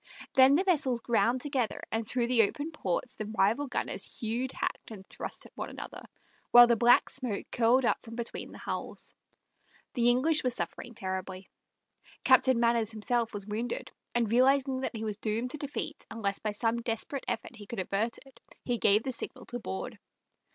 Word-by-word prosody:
Then 265 Hz, +1 st, +7 dB
the 355 Hz, -, +3 dB
vessels 280 Hz, -10 st, +2 dB
ground 235 Hz, +2 st, +1 dB
together, 265 Hz, -5 st, -1 dB
and 225 Hz, -1 st, -2 dB
through 245 Hz, 0 st, 0 dB
the 240 Hz, -1 st, +4 dB
open 290 Hz, +9 st, -1 dB
ports 240 Hz, -, -2 dB
the 215 Hz, -, -5 dB
rival 220 Hz, +6 st, +1 dB
gunners -, -, -2 dB
hewed, 240 Hz, +3 st, -3 dB
hacked, -, -, -4 dB
and 200 Hz, -4 st, -10 dB
thrust -, -, -6 dB
at -, -, -16 dB
one -, -, -5 dB
another, -, -, -8 dB, 0.5 s
while 240 Hz, 0 st, +10 dB
the 235 Hz, 0 st, +3 dB
black 240 Hz, +2 st, +5 dB
smoke 250 Hz, -6 st, -4 dB
curled 245 Hz, +2 st, +3 dB
up -, -, +1 dB
from 230 Hz, -1 st, -10 dB
between 235 Hz, -1 st, -5 dB
the -, -, -11 dB
hulls. -, -, -6 dB, 0.8 s
The 240 Hz, -3 st, +3 dB
English 295 Hz, +6 st, +4 dB
were 255 Hz, -, +2 dB
suffering 240 Hz, -1 st, -4 dB
terribly. 190 Hz, 0 st, -5 dB, 0.7 s
Captain 260 Hz, -1 st, +5 dB
Manners 235 Hz, -2 st, +2 dB
himself 225 Hz, +1 st, 0 dB
was 205 Hz, -2 st, -6 dB
wounded, 225 Hz, +3 st, -4 dB, 0.2 s
and 235 Hz, -1 st, +2 dB
realizing 265 Hz, +2 st, +3 dB
that 260 Hz, -, -3 dB
he 220 Hz, -, -4 dB
was 210 Hz, -2 st, -3 dB
doomed 225 Hz, +3 st, -2 dB
to 305 Hz, -, -5 dB
defeat 295 Hz, +2 st, -5 dB
unless 205 Hz, -3 st, -2 dB
by 215 Hz, -, -2 dB
some 225 Hz, +3 st, 0 dB
desperate 235 Hz, +4 st, -3 dB
effort -, -, -4 dB
he 205 Hz, -2 st, -11 dB
could 235 Hz, -, -5 dB
avert 200 Hz, +5 st, -1 dB
it, 265 Hz, -3 st, -19 dB, 0.3 s
he 240 Hz, -2 st, -1 dB
gave 210 Hz, +2 st, +4 dB
the 265 Hz, -, -2 dB
signal 240 Hz, -, -5 dB
to 245 Hz, -, -5 dB
board. 95 Hz, -, -6 dB
235 Hz, 185 wpm, -30 LUFS, 220-260 Hz, 0.8 s, while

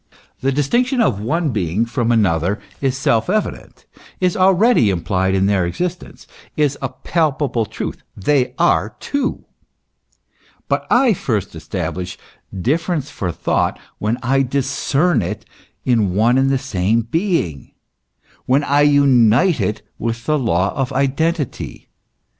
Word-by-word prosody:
The 135 Hz, -, 0 dB
dis 140 Hz, +1 st, 0 dB
tinction 250 Hz, -, +1 dB
of 120 Hz, -, +1 dB
one 155 Hz, +7 st, 0 dB
being 100 Hz, 0 st, 0 dB
from 120 Hz, 0 st, -1 dB
another 95 Hz, -3 st, +1 dB, 0.2 s
is 135 Hz, -1 st, 0 dB
self 115 Hz, 0 st, +1 dB
evident, 215 Hz, +2 st, -3 dB, 0.3 s
is 180 Hz, -2 st, +1 dB
already 190 Hz, -, +4 dB
implied 95 Hz, +1 st, 0 dB
in 95 Hz, 0 st, +2 dB
their 100 Hz, -2 st, +2 dB
existence, 175 Hz, -, -4 dB, 0.3 s
is 145 Hz, -2 st, +2 dB
a 135 Hz, -, -2 dB
palpable 140 Hz, -9 st, -1 dB
truth: -, -, -6 dB, 0.2 s
they 125 Hz, +4 st, +1 dB
are 100 Hz, +5 st, +2 dB
two. 280 Hz, -2 st, -2 dB, 1.2 s
But -, -, -1 dB
I 245 Hz, -2 st, +4 dB
first 110 Hz, -, -2 dB
establish 90 Hz, 0 st, -4 dB, 0.3 s
difference 145 Hz, -, -1 dB
for 90 Hz, -3 st, -3 dB
thought -, -, 0 dB, 0.2 s
when 110 Hz, +3 st, 0 dB
I 135 Hz, +2 st, +2 dB
discern 140 Hz, +3 st, +1 dB
it -, -, -5 dB, 0.4 s
in 110 Hz, -7 st, +2 dB
one 120 Hz, +5 st, +3 dB
and 135 Hz, 0 st, +2 dB
the 135 Hz, -, +2 dB
same 115 Hz, -4 st, 0 dB
being, 140 Hz, -, -2 dB, 0.7 s
when 135 Hz, +3 st, +3 dB
I 145 Hz, 0 st, +2 dB
unite 140 Hz, -, +4 dB
it 105 Hz, +2 st, -2 dB, 0.2 s
with 115 Hz, 0 st, -3 dB
the 155 Hz, -1 st, +1 dB
law 95 Hz, -6 st, +1 dB
of 135 Hz, -1 st, -2 dB
identity. 140 Hz, +2 st, -2 dB
130 Hz, 135 wpm, -19 LUFS, 105-150 Hz, 1.2 s, already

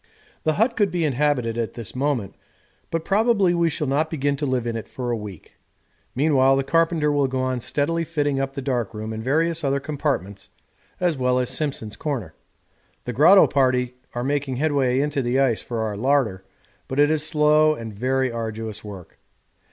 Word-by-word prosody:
The 155 Hz, -, +3 dB
hut 230 Hz, +7 st, +1 dB
could 205 Hz, -2 st, +2 dB
be 170 Hz, -2 st, -1 dB
inhabited 130 Hz, -5 st, 0 dB
at 115 Hz, -, -2 dB
this 115 Hz, -1 st, -8 dB
moment, 130 Hz, -7 st, -1 dB, 0.6 s
but 165 Hz, -1 st, -3 dB
probably 200 Hz, -3 st, +3 dB
we 170 Hz, -1 st, +2 dB
shall 150 Hz, -, -3 dB
not 145 Hz, +3 st, 0 dB
begin 145 Hz, -2 st, 0 dB
to 145 Hz, 0 st, -2 dB
live 130 Hz, -2 st, -1 dB
in 115 Hz, -1 st, -2 dB
it 115 Hz, -, -5 dB
for 125 Hz, -2 st, -4 dB
a -, -, +1 dB
week. 105 Hz, -6 st, -10 dB, 0.6 s
Meanwhile 135 Hz, -1 st, +4 dB
the 135 Hz, -, +1 dB
carpenter 165 Hz, +1 st, +2 dB
will 145 Hz, -2 st, +2 dB
go 130 Hz, 0 st, -2 dB
on 130 Hz, -1 st, -1 dB
steadily 160 Hz, +7 st, -1 dB
fitting 145 Hz, -4 st, -1 dB
up 135 Hz, 0 st, -3 dB
the 140 Hz, -, -4 dB
dark 120 Hz, -5 st, -2 dB
room 110 Hz, +1 st, -5 dB
and 110 Hz, 0 st, -5 dB
various 165 Hz, +5 st, +1 dB
other 140 Hz, 0 st, +1 dB
compartments 140 Hz, -, -3 dB, 0.5 s
as 175 Hz, -6 st, 0 dB
well 125 Hz, 0 st, +2 dB
as 125 Hz, 0 st, +1 dB
Simpson's 130 Hz, -6 st, -3 dB
Corner. 130 Hz, -, -4 dB, 0.7 s
The 125 Hz, -, -3 dB
grotto 170 Hz, -, +7 dB
party 125 Hz, -2 st, +1 dB, 0.2 s
are 120 Hz, -, -2 dB
making 140 Hz, -1 st, -1 dB
headway 135 Hz, -2 st, +1 dB
into 145 Hz, -1 st, -1 dB
the 125 Hz, +1 st, 0 dB
ice 130 Hz, -5 st, +2 dB
for 115 Hz, -2 st, -4 dB
our 110 Hz, -2 st, -2 dB
larder, 115 Hz, -5 st, +1 dB, 0.4 s
but 130 Hz, -, -3 dB
it 145 Hz, +1 st, +5 dB
is 155 Hz, -1 st, +1 dB
slow 155 Hz, 0 st, +4 dB
and 115 Hz, -4 st, -7 dB
very 130 Hz, +4 st, 0 dB
arduous 110 Hz, -2 st, -5 dB
work. 100 Hz, -5 st, -11 dB
135 Hz, 190 wpm, -23 LUFS, 120-150 Hz, 0.7 s, grotto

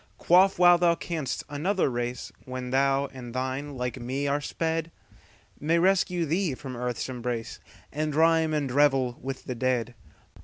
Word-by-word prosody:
Quaff 185 Hz, +3 st, +4 dB
while 175 Hz, -1 st, +6 dB
thou 170 Hz, -1 st, +4 dB
canst; 160 Hz, -6 st, -4 dB
another 170 Hz, +7 st, 0 dB
race, 120 Hz, -1 st, -3 dB
When 130 Hz, -1 st, -5 dB
thou 135 Hz, +1 st, +2 dB
and 125 Hz, -2 st, -9 dB
thine 130 Hz, +2 st, -3 dB
like 125 Hz, -1 st, -3 dB
me 130 Hz, +4 st, -2 dB
are 145 Hz, +1 st, 0 dB
sped, 165 Hz, +2 st, -2 dB, 0.7 s
May 160 Hz, +3 st, +1 dB
rescue 180 Hz, -1 st, +2 dB
thee 165 Hz, -1 st, 0 dB
from 130 Hz, -1 st, -8 dB
earth's 125 Hz, 0 st, -3 dB
embrace, 120 Hz, -3 st, -4 dB, 0.3 s
And 150 Hz, 0 st, -2 dB
rhyme 160 Hz, 0 st, +4 dB
and 145 Hz, -4 st, -1 dB
revel 135 Hz, -3 st, +2 dB
with 135 Hz, 0 st, -5 dB
the 125 Hz, -, -3 dB
dead. 125 Hz, 0 st, -1 dB
140 Hz, 155 wpm, -27 LUFS, 125-165 Hz, 0.7 s, while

